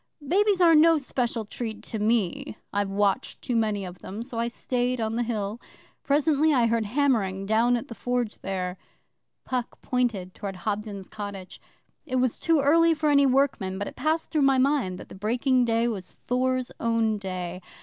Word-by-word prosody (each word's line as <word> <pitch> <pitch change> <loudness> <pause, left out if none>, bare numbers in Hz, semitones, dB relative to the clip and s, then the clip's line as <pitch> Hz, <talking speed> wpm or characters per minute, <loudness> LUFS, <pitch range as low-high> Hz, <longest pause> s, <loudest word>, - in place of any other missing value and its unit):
Babies 400 +4 +3
are 335 -2 +7
no 325 +1 +6
special 245 -5 -2
treat 220 +1 -5
to 220 - -5
me 215 -2 0 0.2
I've 200 -1 0
watched 200 +4 0
too 245 - -1
many 215 -3 0
of 180 0 -9
them 210 +4 -6
so 235 -2 -6
I 235 - +1
stayed 245 +1 -1
on 220 0 -1
the 240 - 0
Hill. 220 -1 -3 0.4
Presently 300 +2 +3
I 240 -2 +4
heard 230 -1 +1
hammering 215 -7 +1
down 230 +4 +3
at 235 - -6
the - - -7
Forge 245 -1 -2
there.'Puck 190 +6 -6
pointed 230 -8 -1
towards 195 -3 -6
Hobden's 205 -1 -3
cottage. 200 -3 -8 0.5
'It 255 - -2
was 255 -2 +1
too 325 -3 +3
early 330 +4 +4
for 305 0 +1
any 280 -1 +5
workmen, 255 -8 +1
but 205 - -3
it - - -8
passed 315 +1 -1
through 305 - +1
my 270 -1 +4
mind 260 -9 +1
that - - -10
the - - -10
breaking 245 +6 +1
day 230 0 +2
was 200 -6 -5
Thor's 255 0 0
own 230 -2 +1
day. 185 -2 -5
235 Hz, 180 wpm, -26 LUFS, 205-265 Hz, 0.5 s, are